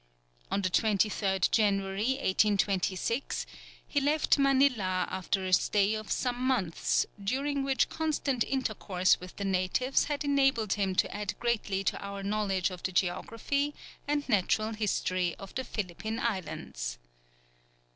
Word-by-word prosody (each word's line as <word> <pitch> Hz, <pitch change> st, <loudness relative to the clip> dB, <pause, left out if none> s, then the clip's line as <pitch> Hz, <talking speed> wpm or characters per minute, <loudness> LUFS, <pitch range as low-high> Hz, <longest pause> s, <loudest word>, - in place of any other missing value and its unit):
On 200 Hz, -, -1 dB
the 185 Hz, -, +1 dB
23rd 200 Hz, -2 st, +2 dB
January, 200 Hz, +2 st, +2 dB
1826, 200 Hz, +1 st, +1 dB, 0.4 s
he 285 Hz, -, 0 dB
left 295 Hz, +1 st, +2 dB
Manilla 260 Hz, -10 st, +3 dB
after 190 Hz, +1 st, -1 dB
a 185 Hz, -, -1 dB
stay 205 Hz, +2 st, +3 dB
of 215 Hz, -1 st, -5 dB
some 250 Hz, -1 st, -1 dB
months, 250 Hz, -11 st, +1 dB, 0.2 s
during 275 Hz, +6 st, 0 dB
which 270 Hz, -3 st, +2 dB
constant 290 Hz, -6 st, 0 dB
intercourse 210 Hz, -8 st, +1 dB
with 180 Hz, 0 st, -10 dB
the 200 Hz, -, -4 dB
natives 190 Hz, +8 st, +1 dB
had 295 Hz, 0 st, -2 dB
enabled 270 Hz, -7 st, +2 dB
him 195 Hz, -2 st, -1 dB
to -, -, +1 dB
add 210 Hz, -1 st, -4 dB
greatly 215 Hz, -5 st, 0 dB
to -, -, -1 dB
our 200 Hz, 0 st, -6 dB
knowledge 195 Hz, -2 st, 0 dB
of 180 Hz, -1 st, -8 dB
the 185 Hz, -, -2 dB
geography 230 Hz, +11 st, -1 dB, 0.3 s
and 290 Hz, 0 st, 0 dB
natural 215 Hz, 0 st, +1 dB
history 185 Hz, -4 st, 0 dB
of 195 Hz, -, -10 dB
the 260 Hz, -, -2 dB
Philippine 220 Hz, 0 st, -4 dB
islands. 145 Hz, -, -3 dB
210 Hz, 135 wpm, -30 LUFS, 190-260 Hz, 0.4 s, Manilla